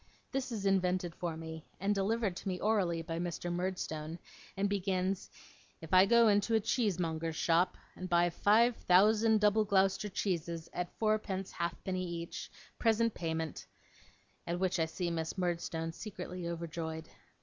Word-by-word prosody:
This 265 -2 -2
is 210 -4 -3
invented 185 -2 +1
for 170 -2 -4
me, 160 -1 -7 0.2
and 200 +2 +1
delivered 205 0 0
to 195 - -7
me 185 -1 -2
orally 185 -6 +1
by 165 0 -4
Mr. 175 0 -3
Murdstone, 170 -3 -3 0.4
and 200 +1 +2
begins, 190 -1 -1 0.5
'If 160 +1 -9
I 185 +1 +7
go 235 +1 +6
into 205 +2 +3
a - - +5
cheesemonger's 170 -8 0
shop, 170 +3 +2 0.2
and 185 0 -6
buy 175 0 +3
five 225 +7 +4
thousand 215 +4 +4
double 210 +1 +4
Gloucester 195 0 +2
cheeses 170 -4 -2
at 180 0 -2
fourpence 215 -3 0
halfpenny 185 +2 -3
each, 170 -1 -5 0.3
present 230 -1 +3
payment' 160 -2 -3 0.8
at 170 +1 -1
which 185 -1 +1
I 160 - +2
see 170 +1 -3
Miss 160 +2 -3
Murdstone 170 -2 -2
secretly 180 -2 -6
overjoyed. 165 -1 -4
180 Hz, 150 wpm, -33 LUFS, 170-205 Hz, 0.8 s, I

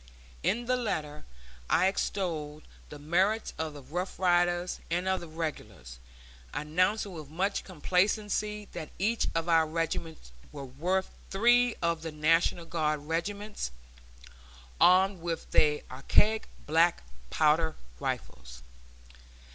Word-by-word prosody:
In 240 +3 0
the 255 +1 +2
letter 150 -11 -3 0.4
I 175 - +4
extolled 165 -6 -2 0.3
the 150 - -9
merits 185 +9 +1
of 160 -1 -2
the 145 - -10
Rough 175 +8 -4
Riders 175 -1 +2
and 175 +3 -1
of 190 0 +1
the 170 - -9
Regulars, 110 - -6 0.6
announcing 185 +7 0
with 155 -4 -8
much 190 +6 -1
complacency 205 +4 0
that 160 -3 -6
each 220 +5 +1
of 165 0 0
our 165 -2 +4
regiments 165 - -3 0.2
was 140 -2 -8
worth 185 +3 0 0.2
"three 240 +4 +4
of 170 -1 +1
the 165 0 -5
National 165 +2 +2
Guard 155 -3 -1
regiments, 200 - -3 1.1
armed 185 0 +5
with 170 -1 -4
their 150 -1 +3
archaic 210 +12 +2 0.2
black 165 - +3 0.3
powder 160 +1 +2 0.2
rifles." - - -5
170 Hz, 120 wpm, -29 LUFS, 155-190 Hz, 1.1 s, armed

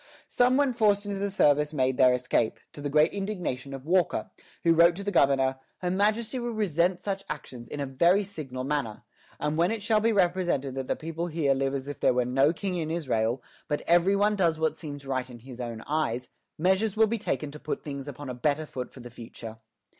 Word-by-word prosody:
Some 250 +1 +3
when 280 -3 +2
forced 210 -3 +2
into 200 -1 -3
the 200 0 -1
service 150 -5 +3
made 130 -2 +1
their 130 -1 +6
escape, 125 -2 0
to 145 - -9
the 145 - -2
great 150 +3 +4
indignation 180 -10 -3
of 135 0 -7
Walker, 180 +2 +1 0.3
who 165 -1 +5
wrote 170 +1 +6
to 200 - -6
the 205 - -2
governor: 135 -4 +3 0.2
"Her 180 -1 -2
Majesty 215 +6 +1
will 240 -1 -3
resent 180 -3 +1
such 195 -1 -3
actions 130 -5 -7
in 145 - -6
a 140 - -1
very 170 +10 +3
signal 145 -10 -6
manner; 135 -6 -2 0.4
and 150 +1 -1
when 170 +2 +3
it 220 -2 -3
shall 215 0 +3
be 225 +2 +2
represented 175 -8 +1
that 135 -1 -4
the - - 0
people 165 +1 -4
live 175 - -7
here 135 -3 +1
as 135 0 -4
if 145 - -6
there - - +3
were 125 -1 +2
no 135 +4 +3
king 180 +1 -3
in 160 -2 -2
Israel, 125 -7 -1 0.2
but 150 - -1
every 175 +3 +3
one 205 +1 +3
does 170 -5 +2
what 160 0 0
seems 145 -3 -8
right 130 -1 -2
in 120 - -10
his 125 +1 -10
own 115 -2 -5
eyes, 125 -5 -1 0.3
measures 190 +5 +1
will 220 - +6
be 225 +1 -2
taken 150 -7 -2
to 150 - -10
put 150 - -4
things 140 -1 -6
upon 145 0 -7
a 125 - -4
better 145 +5 0
foot 125 -4 -6
for 130 - -12
the 120 0 -10
future." 115 -1 -10
155 Hz, 225 wpm, -27 LUFS, 135-190 Hz, 0.4 s, their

